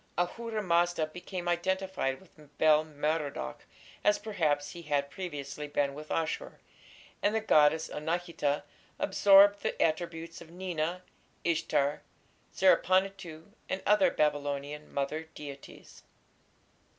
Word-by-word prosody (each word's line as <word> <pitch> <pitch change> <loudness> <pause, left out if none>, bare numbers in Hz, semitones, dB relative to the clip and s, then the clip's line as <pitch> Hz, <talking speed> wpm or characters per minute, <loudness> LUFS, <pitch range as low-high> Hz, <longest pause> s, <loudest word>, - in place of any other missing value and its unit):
Ahura 215 +5 -2
Mazda 175 -2 +2
became 175 +2 -7
identified 180 -5 -1
with 150 -5 -20
Bel 155 -1 +5
Merodach, 150 - -3 0.4
as, 205 - +4
perhaps, 155 -9 -1
he 175 - -9
had 145 -3 -1
previously 150 -5 -6
been 145 -1 0
with 150 +2 -9
Ashur, 165 - -2 0.6
and 210 +2 +2
the - - +3
goddess 160 -6 +4
Anahita 160 -2 -2 0.3
absorbed 200 0 +6
the - - -3
attributes 165 0 -1
of 165 - -12
Nina, 175 0 -3 0.4
Ishtar, 150 -3 +1 0.5
Zerpanituᵐ, 185 -2 +2 0.2
and 190 - -3
other 205 -3 +5
Babylonian 145 -1 -1
"mother 150 +3 -2
deities". 140 -2 -11
165 Hz, 110 wpm, -30 LUFS, 150-185 Hz, 0.6 s, absorbed